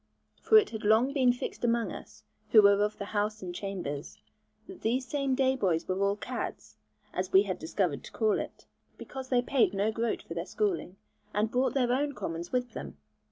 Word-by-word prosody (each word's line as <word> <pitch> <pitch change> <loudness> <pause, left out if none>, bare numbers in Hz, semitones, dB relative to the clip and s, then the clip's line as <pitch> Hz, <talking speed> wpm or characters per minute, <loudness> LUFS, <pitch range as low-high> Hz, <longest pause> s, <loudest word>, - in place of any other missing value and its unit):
For 440 - +6
it 425 -1 +4
had 220 -2 -6
long 220 +6 +4
been 260 -4 +4
fixed 245 - -5
among 235 -1 +1
us, - - -10 0.3
who 215 -2 +7
were 200 0 +6
of 210 +1 -1
the 200 - -5
house 210 0 -2
and 180 -1 -5
chambers, 175 -7 -5 0.5
that 375 - -11
these 250 +4 0
same 275 0 0
day 265 0 +2
boys 180 -9 0
were 185 +1 -1
all 200 0 +2
'caddes,' - - -6 0.4
as 185 +1 -2
we 190 +1 +7
had 190 -3 -4
discovered 160 -4 -1
to - - -10
call 215 -2 +1
it, - - -7 0.3
because 265 -1 -8
they 245 -2 +3
paid 245 -7 +2
no 205 +3 +1
groat 230 +1 -2
for - - -7
their - - -4
schooling, 375 - -1 0.4
and 210 +1 +1
brought 255 +2 +1
their 250 -3 +2
own 285 +2 0
commons 170 -3 -5
with 250 -1 -1
them. - - -7
220 Hz, 205 wpm, -29 LUFS, 195-255 Hz, 0.5 s, who